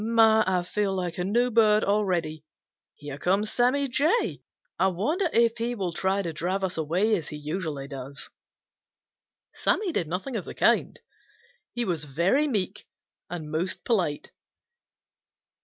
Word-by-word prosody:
My, 220 -1 +5
I 185 -1 +1
feel 195 +1 -1
like 180 -2 -3
a - - 0
new 240 +6 +1
bird 215 -2 +4
already! 175 -7 0 0.5
Here 145 -1 -8
comes 195 +6 +1
Sammy 260 +3 +2
Jay. 295 - +1 0.4
I 190 - +4
wonder 300 - 0
if 230 0 +3
he 240 +1 -1
will 185 -6 -3
try 190 +3 0
to 165 -2 -4
drive 185 +5 -2
us 190 -1 -1
away 180 +8 +1
as 165 -6 -4
he - - -6
usually 150 -2 -4
does." 140 0 -7 1.2
Sammy 405 -4 +1
did 175 - -1
nothing 190 - -4
of 205 - -3
the - - -8
kind. - - +2 0.8
He 240 0 -1
was 165 -6 -2
very 175 - +2
meek 205 -9 -2 0.4
and 160 -4 -6
most 170 +4 -2
polite. 180 -11 0
190 Hz, 150 wpm, -26 LUFS, 165-230 Hz, 1.2 s, My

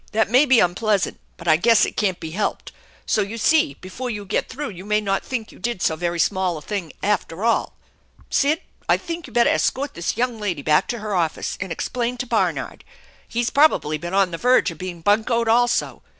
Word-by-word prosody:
That 220 -1 +1
may 265 +5 +5
be 260 -3 +6
unpleasant, 195 +2 +1 0.2
but - - -10
I 155 -1 +6
guess 230 +5 +5
it - - -6
can't 190 -4 0
be 160 - -6
helped, 205 +5 -3 0.3
so 215 - +1
you 205 +3 -4
see 310 +7 +3
before 240 +7 -6
you 205 -3 -5
get 195 - -1
through 285 -2 -5
you 185 -1 -10
may 210 +1 +1
not 195 -2 -1
think 230 -4 -4
you - - -16
did 235 -4 -2
so 160 - +1
very 175 +1 -2
small 185 -1 +1
a - - -8
thing 195 -7 -4
after 205 -2 -1
all. 230 - +1 0.6
Sid, 295 +3 +2 0.3
I - - +5
think 335 -2 -6
you 245 - -14
better 235 0 +4
escort 280 +2 0
this 170 +4 -3
young 240 -1 -1
lady 180 -9 -3
back 150 0 +3
to 240 - -3
her 210 -1 -3
office 170 -4 -1
and 190 -2 -4
explain 245 +6 -2
to 250 - -3
Barnard. - - -1 0.4
He's 235 0 -1
probably 275 - +3
been 175 +4 -4
on 195 -2 +3
the 165 - -5
verge 250 -6 +3
of 165 - -12
being 180 -2 -6
buncoed 225 +5 +2
also. 240 +1 +2
210 Hz, 215 wpm, -22 LUFS, 180-240 Hz, 0.6 s, be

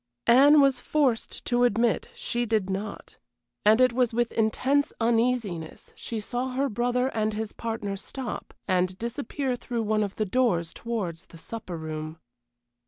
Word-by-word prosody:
Anne 280 +5 +7
was 275 -2 +4
forced 270 -7 0
to 245 0 +2
admit 235 -1 +2
she 240 0 -1
did 215 -4 0
not; 200 +2 -5 0.5
and 215 +3 +5
it 255 -1 +5
was 245 -2 +1
with 240 -1 +1
intense 265 +6 +1
uneasiness 225 -8 0
she 230 - -5
saw 245 +4 -3
her 275 +2 +1
brother 245 +3 0
and 215 -3 -1
his 215 0 -4
partner 220 -3 -3
stop, 245 +4 -6 0.2
and 185 0 +1
disappear 255 +3 -3
through 240 -1 -3
one 215 0 +1
of 200 -2 -2
the 215 - 0
doors 185 -7 +1
towards 190 -7 -4
the 165 - -14
supper 185 -1 -6
room. 155 0 -5
230 Hz, 155 wpm, -27 LUFS, 200-250 Hz, 0.5 s, Anne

